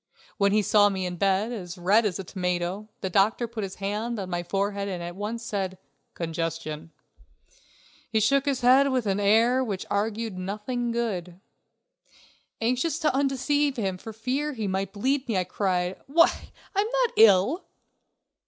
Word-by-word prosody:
When 200 0 +4
he 210 +1 +3
saw 205 +1 +5
me 190 -2 -2
in 180 -1 -4
bed, 195 +4 +1
as 185 -6 -6
red 205 +5 +3
as 180 - -3
a 195 - -5
tomato, 180 +3 -3
the 190 - -2
doctor 210 +5 +2
put 230 -1 -6
his 195 -1 -5
hand 210 +4 -3
on 190 -3 -5
my 175 0 -1
forehead 200 +3 -2
and 185 -3 -3
said 170 - -5
at 175 - -7 0.6
once: - - -33 0.4
"Congestion." 165 -1 -4 1.2
He 220 - +2
shook 275 +6 +3
his 275 -3 0
head 260 +3 +5
with 255 -3 0
an 200 0 0
air 225 +6 +4
which 200 -6 -4
augured 215 -1 -1
nothing 215 +6 -3
good. 185 -7 -3 1.2
Anxious 255 +7 0
to 315 -5 +1
undeceive 280 +1 +1
him 190 -4 -2
for 225 - -8
fear 255 +7 -2
he 220 -5 -3
might 190 0 -2
bleed 260 +7 -1
me, 220 -5 0
I 185 - +2
cried: 180 -1 -1
"Why, 335 +5 +3 0.3
I'm 405 +2 +2 0.2
not 475 - +1
ill!" 220 - +5
205 Hz, 165 wpm, -26 LUFS, 185-245 Hz, 1.2 s, saw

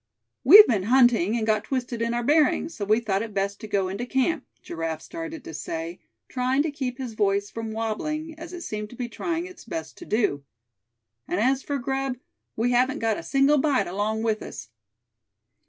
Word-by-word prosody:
"We've 420 +1 +11
been 215 -6 +1
hunting, 240 -5 +4
and 220 - -1
got 215 -1 +1
twisted 245 -3 -3
in 235 +1 0
our 240 - -1
bearings; 305 +3 +3
so 205 - -4
we 215 +3 +3
thought 200 -4 -1
it 220 -2 -6
best 200 +1 -1
to 215 - -6
go 195 -2 0
into 200 +6 -4
camp," 270 +6 0 0.2
Giraffe 165 -1 -4
started 325 -3 -7
to - - -8
say, 165 +3 -5 0.3
trying 255 +2 +1
to 315 - -2
keep 260 -3 -4
his 255 -4 -5
voice 200 -1 0
from 225 -1 -5
wabbling, 305 +9 -3
as 330 +2 -9
it 355 -1 -7
seemed 210 -7 -5
to 245 - -12
be 245 0 -4
trying 335 +7 -3
its 370 0 -11
best 330 -2 -6
to 345 - -9
do. 205 -11 +1 0.8
"And 180 - -1
as 260 +4 +2
for 285 +1 -2
grub, 270 0 -2 0.4
we 235 +3 +1
haven't 255 +2 +2
got 225 -1 0
a - - -5
single 280 -1 +3
bite 280 -2 +2
along 210 +4 -2
with 220 -1 0
us." - - -8
240 Hz, 200 wpm, -25 LUFS, 210-280 Hz, 0.8 s, We've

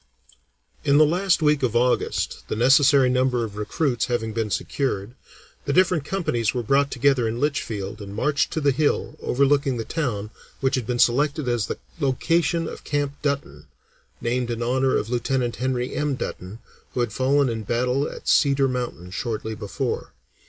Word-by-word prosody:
In 140 0 +4
the 155 - +7
last 175 +2 +1
week 150 -1 +3
in 125 -3 +1
August, 125 +1 0
the - - -2
necessary 135 +3 +5
number 125 -1 +1
of 105 -3 -6
recruits 120 +4 -1
having 115 -3 -2
been 110 -1 -1
secured, 105 -1 -2 0.5
the 140 - 0
different 180 -4 +3
companies 135 - -1
were 120 - -1
brought 140 +5 +2
together 135 -2 +2
in 115 +2 -3
Litchfield 110 -8 -2
and 100 0 -8
marched 145 +7 +1
to - - 0
the 140 -1 +3
hill 145 +2 0
overlooking 140 0 +2
the 115 - -4
town 110 -10 -3 0.3
which 135 -1 0
had 125 -4 -1
been 125 - -1
selected 140 +4 +2
as 120 -3 0
the - - -4 0.2
location 165 +4 +1
of - - -8
Camp 145 -1 -1
Dutton, 140 -1 -3 0.5
named 120 +1 -1
in 120 0 -2
honor 130 +2 +2
of 110 - -3
Lieutenant 125 0 -1
Henry 125 0 -1
M. 150 -2 -1
Dutton, 95 -4 -6 0.4
who 125 - +1
had 120 -3 -1
fallen 135 +3 +2
in 115 -2 -2
battle 125 +6 0
at - - -10
Cedar 140 -1 +4
Mountain 120 -9 -4
shortly 110 +1 -3
before. 105 -2 -4
130 Hz, 170 wpm, -23 LUFS, 115-140 Hz, 0.5 s, the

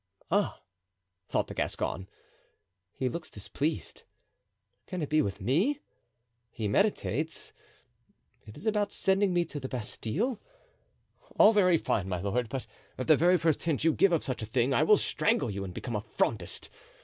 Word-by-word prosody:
"Ah!" - - +1 0.7
thought - - +1
the - - -8
Gascon; 95 0 -2 0.8
"he 130 - -2
looks 155 +6 -4
displeased. 110 - -3 0.9
Can 180 -3 -3
it 145 - -4
be 155 0 +4
with 100 - -3
me? 200 - +1 0.7
He 110 -2 -3
meditates. 160 - 0 0.9
Is 105 - -11
it - - +4
about 205 -1 0
sending 195 0 +2
me 175 -1 +2
to 150 -2 -6
the 130 -1 -5
Bastile? 150 - -2 1.0
All 215 - +8
very 185 -5 +5
fine, 95 - -1
my 90 -2 -1
lord, 110 +5 -1
but 130 +1 -4 0.3
at 130 - -3
the 155 - +6
very 175 +4 +4
first 165 -2 +1
hint 160 -4 0
you 165 -1 +4
give 195 - +4
of 170 - +2
such 130 -3 -3
a - - -3
thing 125 +3 +1
I - - +3
will 205 +7 +6
strangle 225 - +1
you 100 0 -4
and 95 - -5
become 120 +7 -5 0.2
Frondist. 95 -7 -1
150 Hz, 160 wpm, -29 LUFS, 115-180 Hz, 1.0 s, All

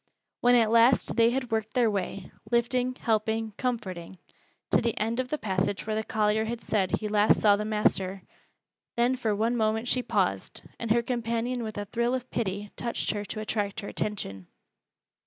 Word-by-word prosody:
When 245 0 +5
at 225 -2 +4
last 235 +2 +4
they 230 0 +5
had 250 -1 -2
worked 220 -1 -2
their 240 -3 +3
way 195 -1 -4 0.2
lifting, 250 +1 +1
helping, 220 -1 0
comforting 190 -8 -3 0.5
to - - +4
the 235 -1 -1
end 225 +3 -1
of 255 -1 -2
the 305 - -1
passage 190 -4 -1
where 215 0 -1
the 220 - 0
collier 215 0 +1
had 235 +1 -3
said 200 -3 -1
he 215 - -2
last 210 0 +4
saw 205 -1 +5
the 210 +1 -3
master, 195 -3 0 0.7
then 240 +2 +2
for 225 -5 -1
one 225 +4 +1
moment 220 +1 0
she 250 - +3
paused, - - -1 0.2
and 230 - -4
her 235 +2 +3
companion 235 0 -2
with 215 -2 -5
a 205 - -3
thrill 235 +4 0
of 255 -1 -6
pity 205 -2 -3
touched 235 -1 -2
her 205 -1 -3
to 215 - -5
attract 210 0 -2
her 200 - -7
attention. 95 - -4
220 Hz, 185 wpm, -28 LUFS, 210-235 Hz, 0.7 s, When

